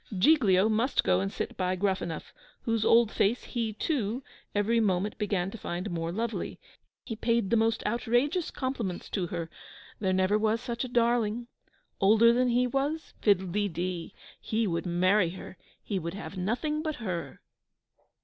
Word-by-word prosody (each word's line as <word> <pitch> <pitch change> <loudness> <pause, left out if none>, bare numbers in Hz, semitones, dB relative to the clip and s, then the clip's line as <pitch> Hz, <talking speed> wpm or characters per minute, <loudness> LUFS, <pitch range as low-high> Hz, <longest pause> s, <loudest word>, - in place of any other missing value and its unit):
Giglio 205 -5 +5
must 225 +5 +1
go 90 0 +3
and 95 +1 -2
sit - - -4
by 185 0 0
Gruffanuff, 185 -4 -2 0.3
whose 225 -2 0
old 230 0 +5
face 225 +5 +1
he, 230 -3 -2
too, 245 -1 -1 0.3
every 220 +3 +2
moment 205 -1 0
began 195 -3 -1
to 230 - -9
find 180 +3 -4
more 165 -1 -2
lovely. 225 +4 -3 0.5
He 225 - -4
paid 230 -2 0
the - - +5
most 225 0 +1
outrageous 245 - +1
compliments 235 -9 -4
to 185 -4 -1
her: 170 -1 -4 0.5
There 190 -2 +1
never 190 +3 +2
was 220 +1 +1
such 235 0 -3
a - - -3
darling. 235 -1 +1 0.5
Older 220 +4 +6
than 250 +1 +2
he 245 +1 +3
was? 275 +5 -2
Fiddle 190 -3 +3
de 205 +2 +1
dee! 175 +1 -4 0.2
He 225 +1 -1
would 170 -2 -1
marry 185 +2 +3
her 185 +1 -9 0.3
he 200 -3 -2
would 170 +1 -5
have 200 0 -7
nothing 245 - -1
but 310 -1 -2
her! 185 -10 -5
215 Hz, 165 wpm, -29 LUFS, 185-235 Hz, 0.5 s, Older